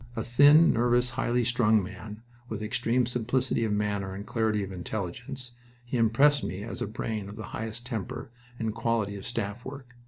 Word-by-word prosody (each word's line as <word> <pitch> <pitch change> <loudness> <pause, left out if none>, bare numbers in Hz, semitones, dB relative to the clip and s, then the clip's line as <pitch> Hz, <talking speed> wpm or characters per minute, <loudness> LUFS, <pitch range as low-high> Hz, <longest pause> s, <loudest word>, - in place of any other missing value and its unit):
A 115 - -2
thin, 145 +7 +7
nervous, 120 +1 +2
highly 120 0 +1
strung 110 -3 +3
man, 105 +3 -8 0.3
with 110 -1 -4
extreme 120 +2 +1
simplicity 125 +1 0
of 110 - -1
manner 100 -2 -1
and 100 +1 -6
clarity 110 -4 0
of 95 - -6
intelligence, 110 +7 -5 0.3
he 120 - -4
impressed 130 +6 +4
me 95 +2 -4
as 115 - -5
a - - -1
brain 110 -2 -4
of 105 - -8
the 110 - -7
highest 110 +1 -4
temper 120 0 -5 0.3
and 110 -2 -2
quality 115 -3 0
in 100 - -6
staff 115 0 -4
work. 130 -2 -9
115 Hz, 180 wpm, -28 LUFS, 105-125 Hz, 0.3 s, thin